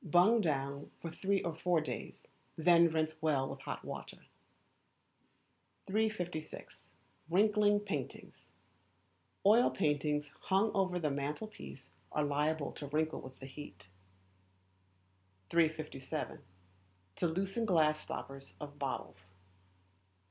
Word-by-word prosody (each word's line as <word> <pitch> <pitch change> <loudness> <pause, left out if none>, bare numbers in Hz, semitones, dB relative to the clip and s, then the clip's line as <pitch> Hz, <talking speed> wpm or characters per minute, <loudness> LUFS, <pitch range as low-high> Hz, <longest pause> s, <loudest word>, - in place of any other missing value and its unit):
Bung 180 +7 +5
down 140 -4 -1
for 165 - -5
three 195 +4 0
or 170 - -1
four 175 +1 +2
days, 155 - -5 0.3
then 170 +1 +6
rinse 155 0 -1
well 145 -4 +2
with 135 - -6
hot - - -5
water. - - -7 1.6
356. 190 -6 -2 0.4
Wrinkly 205 +3 +4
Paintings. 205 -1 -5 1.0
Oil 225 +5 +7
paintings 150 -3 0
hung 195 +3 +3
over 190 -3 +1
the 155 -4 0
mantel 145 +8 -2
piece 140 -10 -11 0.2
are 150 - +1
liable 145 +1 0
to 145 - -7
wrinkle 155 +2 0
with 130 0 -11
the 135 - -9
heat. 105 -8 -10 1.6
357. 155 -3 0 0.8
To 175 - +2
Loosen 195 +7 -1
Glass 155 -5 +4
Stoppers 135 0 -7
of 145 -1 -8
Bottles. 95 -9 -4
155 Hz, 110 wpm, -34 LUFS, 145-190 Hz, 1.6 s, Oil